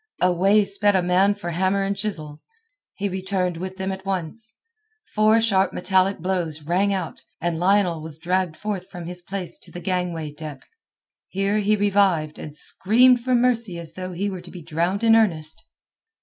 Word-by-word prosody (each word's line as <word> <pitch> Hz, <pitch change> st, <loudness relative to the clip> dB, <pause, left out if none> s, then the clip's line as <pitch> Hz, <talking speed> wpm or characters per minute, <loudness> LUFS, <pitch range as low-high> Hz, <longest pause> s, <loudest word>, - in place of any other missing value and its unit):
Away 190 Hz, +4 st, +4 dB
sped 200 Hz, 0 st, +1 dB
a 185 Hz, -, +3 dB
man 190 Hz, +3 st, +3 dB
for 175 Hz, -4 st, -5 dB
hammer 190 Hz, +3 st, +1 dB
and 195 Hz, +1 st, -1 dB
chisel. 160 Hz, -8 st, -4 dB, 0.5 s
He 200 Hz, -, -2 dB
returned 185 Hz, -2 st, -2 dB
with 185 Hz, +2 st, -6 dB
them 190 Hz, 0 st, -2 dB
at 190 Hz, 0 st, -6 dB
once. 195 Hz, +4 st, -3 dB, 0.6 s
Four 215 Hz, +1 st, +4 dB
sharp 195 Hz, -4 st, +2 dB
metallic 190 Hz, +1 st, +2 dB
blows 170 Hz, -4 st, -2 dB
rang 185 Hz, +6 st, +1 dB
out, 185 Hz, -4 st, -3 dB, 0.2 s
and 170 Hz, -1 st, -1 dB
Lionel 180 Hz, -3 st, +2 dB
was 155 Hz, -1 st, -6 dB
dragged 175 Hz, 0 st, -1 dB
forth 200 Hz, -3 st, -4 dB
from 175 Hz, -3 st, -8 dB
his 175 Hz, +1 st, -5 dB
place 185 Hz, 0 st, -4 dB
to -, -, -11 dB
the 175 Hz, -, -7 dB
gangway 175 Hz, -4 st, -2 dB
deck. 150 Hz, -1 st, -9 dB, 0.6 s
Here 195 Hz, +2 st, 0 dB
he 210 Hz, +1 st, +2 dB
revived, 195 Hz, -7 st, +2 dB
and 150 Hz, -1 st, -6 dB
screamed 240 Hz, +10 st, +4 dB
for 255 Hz, 0 st, +2 dB
mercy 235 Hz, -6 st, +1 dB
as 165 Hz, -1 st, -6 dB
though 185 Hz, +1 st, -6 dB
he 195 Hz, +4 st, -2 dB
were 190 Hz, -3 st, -5 dB
to 175 Hz, -, -12 dB
be 175 Hz, -3 st, -10 dB
drowned 170 Hz, +7 st, -1 dB
in 225 Hz, 0 st, +6 dB
earnest. 165 Hz, -7 st, +1 dB
185 Hz, 180 wpm, -23 LUFS, 170-200 Hz, 0.6 s, in